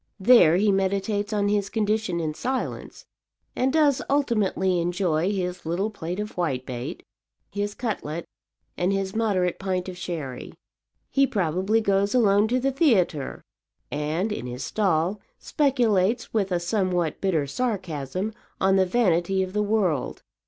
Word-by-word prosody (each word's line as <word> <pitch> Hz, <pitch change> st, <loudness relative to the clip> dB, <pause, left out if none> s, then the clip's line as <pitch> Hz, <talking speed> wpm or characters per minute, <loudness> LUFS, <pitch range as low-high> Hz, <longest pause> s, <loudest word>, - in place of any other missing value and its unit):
There 190 Hz, -6 st, +6 dB
he 205 Hz, +2 st, +3 dB
meditates 200 Hz, +2 st, 0 dB
on 205 Hz, -1 st, +1 dB
his 205 Hz, -1 st, 0 dB
condition 215 Hz, -4 st, 0 dB
in 155 Hz, -2 st, -2 dB
silence, 260 Hz, +10 st, -4 dB, 0.5 s
and 260 Hz, +1 st, +1 dB
does 290 Hz, -3 st, +3 dB
ultimately 210 Hz, -9 st, +1 dB
enjoy 175 Hz, 0 st, 0 dB
his 180 Hz, -2 st, -3 dB
little 180 Hz, +7 st, -1 dB
plate 180 Hz, -2 st, -5 dB
of 210 Hz, +1 st, -4 dB
whitebait, 130 Hz, -7 st, -3 dB, 0.5 s
his 205 Hz, 0 st, -3 dB
cutlet 170 Hz, -9 st, -4 dB, 0.5 s
and 180 Hz, +2 st, 0 dB
his 195 Hz, 0 st, -2 dB
moderate 195 Hz, -6 st, 0 dB
pint 185 Hz, -1 st, -2 dB
of 185 Hz, -, -6 dB
sherry. 160 Hz, -8 st, -6 dB, 0.6 s
He 275 Hz, 0 st, +3 dB
probably 190 Hz, +3 st, +1 dB
goes 200 Hz, +1 st, +1 dB
alone 210 Hz, -3 st, +4 dB
to 250 Hz, +3 st, +1 dB
the 270 Hz, +2 st, +1 dB
theatre, 210 Hz, -, +1 dB, 0.5 s
and, 155 Hz, +8 st, -1 dB
in 125 Hz, -11 st, -4 dB
his 125 Hz, +2 st, -5 dB
stall, 185 Hz, +4 st, 0 dB, 0.2 s
speculates 240 Hz, -, +1 dB
with 200 Hz, -4 st, 0 dB
a 175 Hz, -, +1 dB
somewhat 175 Hz, -3 st, -1 dB
bitter 170 Hz, -7 st, +1 dB
sarcasm 185 Hz, -, -3 dB, 0.3 s
on 190 Hz, 0 st, +3 dB
the 190 Hz, -1 st, +3 dB
vanity 190 Hz, -3 st, +2 dB
of 185 Hz, 0 st, -6 dB
the 210 Hz, -, +1 dB
world. 200 Hz, -, 0 dB
195 Hz, 140 wpm, -25 LUFS, 175-215 Hz, 0.6 s, There